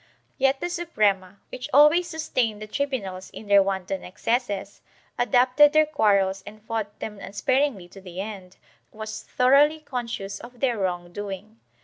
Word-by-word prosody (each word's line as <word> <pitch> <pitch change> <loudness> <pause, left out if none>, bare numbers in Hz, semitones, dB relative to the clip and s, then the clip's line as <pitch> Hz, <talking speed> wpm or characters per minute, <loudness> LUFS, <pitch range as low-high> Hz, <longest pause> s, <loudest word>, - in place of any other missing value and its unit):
Yet 270 0 +3
the 350 - -1
Suprema, 205 - 0
which 255 - -6
always 300 +6 +6
sustained 255 -9 -1
the 215 - -6
tribunals 210 -7 -3
in - - -10
their 200 -1 +6
wanton 190 -1 -2
excesses, 205 +1 -2 0.4
adopted 255 +4 +5
their 310 0 +5
quarrels 200 -9 +2
and 210 +2 -11
fought 215 -1 -4
them 210 -2 -6
unspar 205 +7 0
ingly 225 -12 -1
to 195 - -12
the 180 -1 -9
end, 195 -3 -7 0.3
was 215 0 -7
thoroughly 280 +5 +4
conscious 235 -8 -5
of 245 0 -12
their 240 -4 0
wrong 175 -2 -2
doing. 205 +2 -7
215 Hz, 150 wpm, -25 LUFS, 195-265 Hz, 0.4 s, always